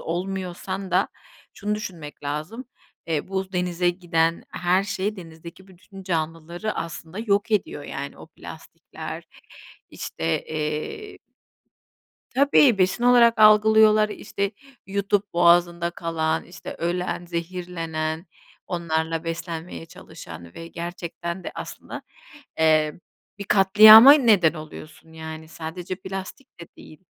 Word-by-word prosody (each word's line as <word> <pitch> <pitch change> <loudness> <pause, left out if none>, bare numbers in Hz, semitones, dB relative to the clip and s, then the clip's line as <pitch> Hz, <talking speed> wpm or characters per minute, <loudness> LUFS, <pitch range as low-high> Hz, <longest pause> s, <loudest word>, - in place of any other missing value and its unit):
olmuyorsan 185 +2 -4
da - - +2 0.5
şunu 210 0 -2
düşünmek 170 -10 -8
lazım, 155 - -5 0.4
eee, 160 +1 -2
bu 190 0 -3
denize 180 0 0
giden 165 -2 0
her 180 +2 +1
şey 205 +1 -3
denizdeki 170 +2 -12
bütün 190 +1 -14
canlıları 165 +3 -3
aslında 165 +3 -6
yok 210 0 0
ediyor, 195 -8 -1
yani. 140 +1 -7
O - - -12
plastikler, - - -10 0.7
işte, 80 0 -3
eee 155 - -4 1.2
Tabii. 275 -4 +5
Besin 190 +6 +1
olarak 235 -2 +5
algılıyorlar. 215 0 +6
İşte, 200 -1 -4 0.3
yutup 200 +1 -1
boğazında 170 0 +3
kalan, 160 -2 -2
işte, 175 -1 -9
ölen, 175 0 -2
zehirlenen, 170 -1 -4 0.4
onlarla 165 -1 -2
beslenmeye 165 0 -6
çalışan 85 - -12
ve 165 - -9
gerçekten 170 +1 -6
de - - -4
aslında, - - -8 0.6
eee, 155 -1 +2 0.4
bir 200 - -6
katliama 215 +7 +9
neden 215 - +4
oluyorsun, 155 +1 -11
yani, 160 0 -8
sadece 170 +3 -6
plastik 195 +5 -9
de 170 - -9
değil, 155 +4 -15
175 Hz, 110 wpm, -24 LUFS, 165-200 Hz, 1.2 s, katliama